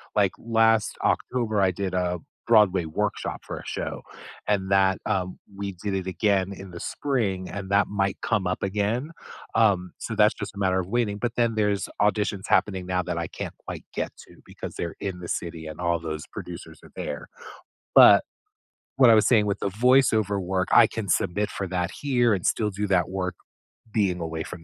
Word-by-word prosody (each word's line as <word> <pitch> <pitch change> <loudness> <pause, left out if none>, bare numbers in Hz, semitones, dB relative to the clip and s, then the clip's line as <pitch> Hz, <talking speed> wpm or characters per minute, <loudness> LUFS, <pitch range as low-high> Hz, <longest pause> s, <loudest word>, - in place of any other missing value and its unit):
Like, 100 -2 +3
last 115 -1 +2
October 115 -5 0
I 95 - +4
did 95 0 -3
a 90 -1 0 0.3
Broadway 95 -5 +5
workshop 105 +7 -2
for - - -5
a - - -12
show, - - -4 0.5
and 100 -2 0
that, 95 -1 +4
um, 95 -3 -2 0.2
we 100 -1 -4
did 100 +3 -4
it 95 -1 -2
again 95 0 +1
in 95 -1 -10
the 85 - -8
spring, 100 -11 -2
and 100 -1 -6
that 100 +1 +4
might 100 -1 -1
come 105 -5 0
up 90 - -2
again, 105 - -1 0.4
um, 100 -5 +3
so 110 - -5
that's 105 0 +5
just - - -7
a - - -11
matter 95 -1 +2
of 90 - -3
waiting, 105 -2 0
but 120 +1 -2
then 115 -2 +1
there's 105 -2 +1
auditions 105 -1 +1
happening 95 -3 +1
now 90 0 0
that - - -3
I - - -2
can't - - -7
quite - - -6
get - - -2 0.2
to - - -18
because - - -8
they're 85 -1 -4
in 95 -3 -4
the 90 - -7
city 85 -1 -4
and 80 +2 -8
all 85 -1 +1
those 80 -1 -5
producers - - -9
are - - -15
there, 75 - -5 0.7
but - - +9 0.7
what 130 -3 +7
I - - +8
was 110 - +4
saying 110 -4 +4
with 100 0 -1
the - - -1
voice 125 +6 +4
over 105 -2 +1
work, 95 0 -1
I 115 - +8
can 110 -2 -5
submit 100 +3 0
for 100 - -4
that 90 0 -1
here, 120 -6 +1
and 90 - -2
still 105 -2 +1
do 100 +2 -3
that 90 -3 +2
work 90 -1 -3 0.6
being 95 -5 +1
away 80 -1 -4
from 85 -2 -9
100 Hz, 200 wpm, -25 LUFS, 90-105 Hz, 0.7 s, but